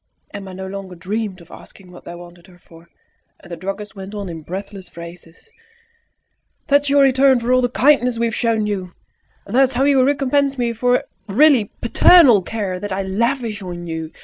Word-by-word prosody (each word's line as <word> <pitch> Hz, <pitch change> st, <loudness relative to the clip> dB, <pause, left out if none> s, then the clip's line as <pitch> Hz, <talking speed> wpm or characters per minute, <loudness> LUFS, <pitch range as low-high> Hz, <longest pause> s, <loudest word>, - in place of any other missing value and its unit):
Emma 195 Hz, -2 st, -8 dB
no 190 Hz, +1 st, -7 dB
longer 190 Hz, -1 st, -8 dB
dreamed 195 Hz, +1 st, -4 dB
of 170 Hz, -, -18 dB
asking 185 Hz, -2 st, -15 dB
what 175 Hz, -, -15 dB
they 175 Hz, -, -8 dB
wanted 175 Hz, +1 st, -14 dB
her 180 Hz, -2 st, -19 dB
for, 170 Hz, -1 st, -19 dB, 0.5 s
and -, -, -16 dB
the -, -, -4 dB
druggist 195 Hz, +4 st, -7 dB
went 195 Hz, +1 st, -9 dB
on 200 Hz, -3 st, -5 dB
in 165 Hz, -1 st, -7 dB
breathless 190 Hz, +2 st, -8 dB
phrases 170 Hz, -, -13 dB, 1.2 s
"That 285 Hz, 0 st, +4 dB
is 285 Hz, -, -4 dB
your 280 Hz, 0 st, +4 dB
return 265 Hz, -1 st, +4 dB
for 240 Hz, +2 st, 0 dB
all 255 Hz, -, +4 dB
the 245 Hz, -, 0 dB
kindness 250 Hz, -2 st, +2 dB
we 235 Hz, -, 0 dB
have 230 Hz, -, -2 dB
shown 225 Hz, -2 st, 0 dB
you! 190 Hz, -4 st, -4 dB, 0.5 s
That 235 Hz, +7 st, +1 dB
is 265 Hz, 0 st, +2 dB
how 250 Hz, +2 st, 0 dB
you 275 Hz, -2 st, +4 dB
recompense 275 Hz, 0 st, +1 dB
me 240 Hz, -2 st, -1 dB
for 245 Hz, +2 st, +1 dB, 0.2 s
the 195 Hz, -, -7 dB
really 280 Hz, -5 st, +5 dB, 0.2 s
paternal 245 Hz, -, +6 dB
care 190 Hz, -2 st, -4 dB
that 205 Hz, +1 st, -6 dB
I 195 Hz, +1 st, -2 dB
lavish 225 Hz, +2 st, -2 dB
on 175 Hz, -2 st, -7 dB
you! 160 Hz, -1 st, -6 dB
205 Hz, 200 wpm, -19 LUFS, 185-255 Hz, 1.2 s, paternal